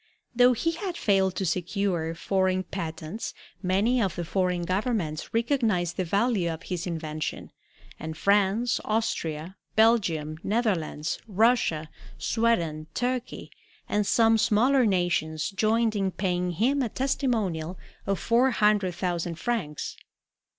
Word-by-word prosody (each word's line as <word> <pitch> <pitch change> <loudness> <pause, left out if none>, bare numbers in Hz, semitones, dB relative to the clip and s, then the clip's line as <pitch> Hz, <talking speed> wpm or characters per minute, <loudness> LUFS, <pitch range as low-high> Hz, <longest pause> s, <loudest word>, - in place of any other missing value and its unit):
Though 250 +1 +6
he 330 +8 0
had 345 +1 -4
failed 190 -3 +2
to 190 - -1
secure 175 -1 -1
foreign 185 +1 +1
patents, 165 +2 -5 0.3
many 205 +7 +2
of 190 -6 0
the 175 - -3
foreign 180 0 0
governments 185 -5 -1
recognized 225 - +1
the 185 - -1
value 200 0 +1
of 165 +2 -7
his 180 -2 -4
invention, 155 -2 -4 0.5
and 160 0 -6
France, 200 +6 +2
Austria, 185 -6 -2 0.2
Belgium, 170 -9 +2
Netherlands, 190 -9 -1
Russia, 210 -7 +2 0.3
Sweden, 170 -10 0
Turkey, 250 0 -3 0.4
and 210 -1 0
some 225 -1 +4
smaller 245 +4 +4
nations 175 -4 0
joined 220 +2 +1
in 195 -2 +1
paying 180 -2 -1
him 260 - +1
a 245 - 0
testimonial 215 - -1 0.3
of 195 -2 0
four 240 +3 +3
hundred 210 -6 +2
thousand 175 -2 -2
francs. 170 -7 -3
195 Hz, 120 wpm, -27 LUFS, 170-230 Hz, 0.5 s, Though